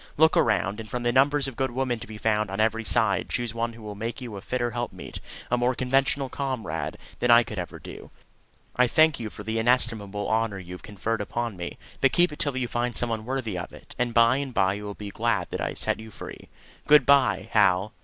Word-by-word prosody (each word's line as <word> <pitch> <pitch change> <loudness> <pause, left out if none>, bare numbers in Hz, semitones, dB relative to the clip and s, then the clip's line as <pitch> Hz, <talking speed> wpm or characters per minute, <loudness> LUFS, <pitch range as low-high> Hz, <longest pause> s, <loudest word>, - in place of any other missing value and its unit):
Look 160 +2 +5
around, 105 -2 +2
and 110 -1 -8
from 125 +3 -3
the 120 - +2
numbers 140 +2 +3
of 135 - -6
good 130 +1 0
women 125 -1 -1
to - - -9
be 110 - -8
found 105 -1 +1
on 95 - -5
every 110 +1 +1
side 110 -2 +1
choose 120 -2 -2
one 115 0 -2
who 115 -1 -13
will 105 -1 -6
make 115 +4 -5
you 120 -5 -7
a 100 - -7
fitter 120 +1 -2
helpmeet, 120 0 -5 0.3
a 125 - +2
more 125 +1 +1
conventional 135 +2 +1
comrade, 115 - -3 0.2
than 125 - +1
I 120 0 +8
could 110 -4 -6
ever 90 - -5
do. - - -10 0.7
I 125 0 +4
thank 155 +3 +4
you 110 -2 -4
for 105 - -10
the 110 +2 -2
inestimable 110 -4 +2
honour 110 -2 0
you 90 -1 -9
have 90 - -9
conferred 105 +2 -3
upon 115 +1 -3
me; 85 -1 -6 0.2
but 135 - +4
keep 175 -1 +4
it - - -11
till 140 -3 -1
you 125 -2 -1
find 120 0 -2
some 120 - +2
one 110 -1 -3
worthy 125 -5 -3
of 90 - -6
it, - - -13
and 125 -1 +1
by 115 +2 +5
and 140 -3 -4
by 95 0 +3
you 105 +1 -6
will 100 -1 -6
be 105 -1 -7
glad 110 -6 -1
that - - -3
I - - 0
have - - -8
set - - 0
you 110 0 -9
free. - - -10 0.4
Good 150 0 +7
bye, 140 -2 +4
Hal! 100 0 +3
115 Hz, 245 wpm, -26 LUFS, 105-125 Hz, 0.7 s, I